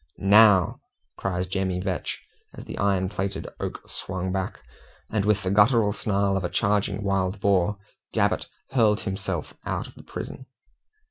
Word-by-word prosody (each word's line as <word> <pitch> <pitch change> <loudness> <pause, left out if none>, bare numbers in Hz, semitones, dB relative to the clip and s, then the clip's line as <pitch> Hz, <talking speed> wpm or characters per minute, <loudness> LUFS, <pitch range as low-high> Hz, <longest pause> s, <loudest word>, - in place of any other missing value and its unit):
"NOW!" 100 -2 +6 0.4
cries 90 -1 -2
Jemmy 95 -1 -1
Vetch, 90 -4 -3 0.4
as - - -9
the - - -7
iron 95 -2 +2
plated 95 0 -3
oak - - -5
swung 95 -1 -3
back, 95 -1 -3 0.5
and 105 -2 +1
with 105 -1 +2
the 95 - 0
guttural 105 +1 +4
snarl 100 -1 +1
of 95 - -1
a 90 - -1
charging 100 -1 +1
wild 95 0 0
boar, 100 0 +2 0.3
Gabbett - - +1 0.2
hurled 110 -5 +3
himself 95 -2 -3
out - - -2
of - - -12
the - - -13
prison. 130 - -7
100 Hz, 150 wpm, -25 LUFS, 95-105 Hz, 0.5 s, NOW